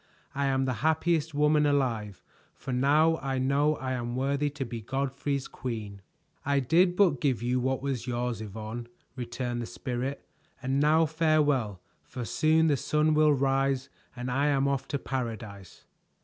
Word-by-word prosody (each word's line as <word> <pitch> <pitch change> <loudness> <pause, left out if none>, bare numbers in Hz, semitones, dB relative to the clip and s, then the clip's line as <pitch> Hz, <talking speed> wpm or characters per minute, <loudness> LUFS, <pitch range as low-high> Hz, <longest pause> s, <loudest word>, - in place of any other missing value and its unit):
I 140 0 -1
am 135 0 +1
the 130 - 0
happiest 160 0 +1
woman 150 0 +3
alive, 115 -9 -1 0.3
for 130 - -6
now 150 +6 +3
I 135 -2 -3
know 140 +4 +2
I 130 -2 -4
am 120 -1 -3
worthy 140 +3 0
to 140 -1 -5
be 115 -1 -6
Godfrey's 135 +3 -2
queen." 110 -6 -6 0.4
"I 140 0 +2
did 175 +7 +3
but 175 -10 +3
give 130 -5 0
you 125 +1 +1
what 130 +1 -1
was 130 -4 -3
yours, 120 -2 -2
Yvonne," 110 +3 -6 0.3
returned 120 -1 -3
the 115 - -5
Spirit, 125 +3 -4 0.3
"and 135 +1 -1
now 155 +3 +4
farewell, 150 - +1 0.2
for 125 -2 -7
soon 160 +6 +3
the 150 -3 +3
sun 150 +3 +1
will 155 0 +5
rise 135 0 +1 0.3
and 125 0 -4
I 140 +3 +1
am 140 -1 +2
off 140 -2 -1
to 145 - -1
paradise." 110 -8 -6
135 Hz, 165 wpm, -28 LUFS, 120-145 Hz, 0.4 s, will